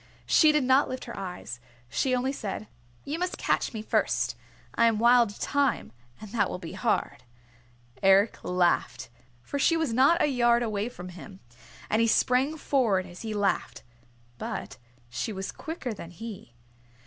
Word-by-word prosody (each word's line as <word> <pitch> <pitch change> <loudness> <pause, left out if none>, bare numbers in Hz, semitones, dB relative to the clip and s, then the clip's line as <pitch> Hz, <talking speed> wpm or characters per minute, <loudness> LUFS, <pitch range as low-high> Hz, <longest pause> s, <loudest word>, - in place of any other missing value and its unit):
She 310 -2 +5
did 300 -2 +2
not 260 +2 +4
lift 255 - -5
her 235 - -7
eyes. 180 -10 -6 0.3
She 255 - 0
only 255 +2 0
said, 215 -3 -5 0.4
"You 305 +4 -3
must 360 0 -2
catch - - 0
me 220 -2 -6
first. - - 0 0.4
I 230 - +4
am 225 -2 +2
Wild 235 -2 +4
Thyme, 285 - 0 0.3
and 215 -2 -10
that 235 - +1
will - - -4
be 165 -3 -8
hard!" 230 -3 -1 0.8
Eric 195 +2 +4
laughed, 175 -9 0 0.3
for 285 - -4
she 330 +4 +3
was 320 -8 -1
not 275 +8 +5
a - - +4
yard 240 -4 +3
away 215 0 -2
from 180 -6 -9
him. 185 +2 -11 0.5
And 220 - +2
he 230 - +3
sprang 260 +7 +2
forward 230 -11 +1
as 180 -1 -11
he 220 -2 -4
laughed. 205 -1 -1 0.6
But - - -5 0.3
she 125 - -4
was 190 -1 -5
quicker 315 -7 -5
than 170 -5 -9
he. 185 - -9
230 Hz, 165 wpm, -27 LUFS, 195-260 Hz, 0.8 s, She